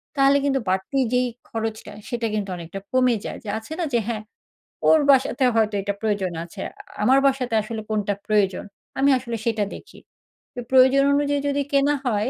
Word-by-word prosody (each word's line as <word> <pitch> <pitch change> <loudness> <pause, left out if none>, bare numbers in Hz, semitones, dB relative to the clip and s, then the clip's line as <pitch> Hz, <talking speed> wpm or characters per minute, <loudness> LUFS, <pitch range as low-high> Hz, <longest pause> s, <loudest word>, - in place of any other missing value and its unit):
তাহলে 275 0 +5
কিন্তু 270 -1 +1
বাড়তি 190 +8 -1 0.2
যেই 250 0 +2 0.2
খরচটা 220 -2 -4 0.2
সেটা 235 -1 -1
কিন্তু 205 -2 -2
অনেকটা 170 +3 -7
কমে 255 -2 +3
যায়। - - -5
যে 215 - -7
আছে 220 +8 -8
না 345 - 0
যে, 240 - +4
হ্যাঁ? 220 -3 -3 0.6
ওর 315 - +6
বাসাতে 265 -1 +4
হয়তো 220 -1 +2
এটা 200 +1 -2
প্রয়োজন 205 -4 -1
আছে। 170 - -10
আ - - -21 0.3
আমার 265 +5 +5
বাসাতে 255 -3 -1
আসলে 220 +1 -5
কোনটা 210 -2 0
প্রয়োজন 205 -3 +1 0.4
আমি 275 - +4
আসলে 235 -2 -5
সেটা 225 -3 +1
দেখি। - - -13 0.7
প্রয়োজন 265 +1 +6
অনুযায়ী 285 0 +1
যদি 285 0 0
কেনা 285 +1 +3
হয় 220 -1 0
235 Hz, 175 wpm, -23 LUFS, 210-270 Hz, 0.7 s, ওর